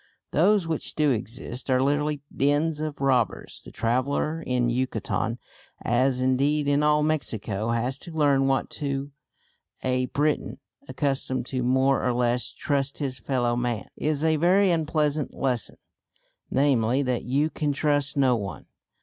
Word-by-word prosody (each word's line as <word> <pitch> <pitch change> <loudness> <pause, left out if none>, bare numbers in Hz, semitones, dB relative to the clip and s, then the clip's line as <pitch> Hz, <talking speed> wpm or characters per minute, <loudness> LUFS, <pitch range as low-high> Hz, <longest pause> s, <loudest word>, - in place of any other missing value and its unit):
Those 190 +3 +3
which 160 -2 -2
do 150 -2 +3
exist 120 +3 -3
are 130 -1 +3
literally 145 +2 0
dens 145 +3 +1
of 155 -2 -4
robbers. 130 -4 0
The - - -11
traveller 140 +7 -1
in 125 -4 0
Yucatan 120 -2 -1 0.4
as 125 +2 +1
indeed 140 +3 +1
in 145 0 +3
all 150 0 +3
Mexico 115 -8 -1
has 120 +3 -1
to 175 - -10
learn 140 -4 +2
what 135 0 0
to 140 0 -2 0.7
a 130 0 0
Briton, 150 +2 -1 0.3
accustomed 130 -3 -1
to 130 - 0
more 130 +2 +2
or 125 - +1
less 120 0 0
trust 140 -3 -2
his 130 -4 -3
fellow 120 -1 0
man, 120 -3 -2
is 150 0 -1
a 160 -1 +3
very 185 +4 +4
unpleasant 155 -3 0
lesson, 125 -4 -2 0.7
namely 130 -1 +2
that 125 -2 -1
you 145 +5 +1
can 150 -2 -1
trust 145 -1 0
no 130 -3 +4
one. 100 -3 -5
135 Hz, 145 wpm, -25 LUFS, 125-150 Hz, 0.7 s, very